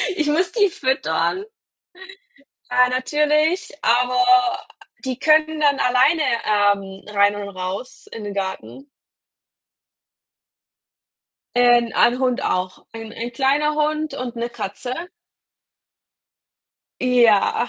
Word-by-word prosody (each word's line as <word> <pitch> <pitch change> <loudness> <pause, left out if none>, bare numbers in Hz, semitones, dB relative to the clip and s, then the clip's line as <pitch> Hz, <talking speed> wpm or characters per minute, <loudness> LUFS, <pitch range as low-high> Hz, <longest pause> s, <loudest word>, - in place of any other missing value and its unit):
ich 305 -4 -1
muss 345 +4 +1
die 410 -4 +2
füttern 300 +7 -1 1.3
ja 250 0 +4
natürlich, 300 +6 0
aber 250 +7 +2 0.8
die 260 -1 -4
können 310 +1 +2
dann 285 -2 +2
alleine, 260 +6 +3 0.2
ähm, 200 -2 0
rein 205 0 +3
und 200 -1 -6
raus 185 +7 -6
in 225 - -7
den 205 -1 -6
Garten. 195 +8 -6 2.7
Äh, 245 0 +5
'n 230 - -7
ein 245 +1 +3
Hund 255 0 0
auch. 185 -5 -3
Ein 225 -1 -9
ein 235 +1 -6
kleiner 285 +4 +1
Hund 305 +1 -1
und 245 -2 -6
'ne 235 +1 -3
Katze. 240 +2 -6 2.1
Ja, 240 -2 +3
250 Hz, 105 wpm, -21 LUFS, 225-300 Hz, 2.7 s, Äh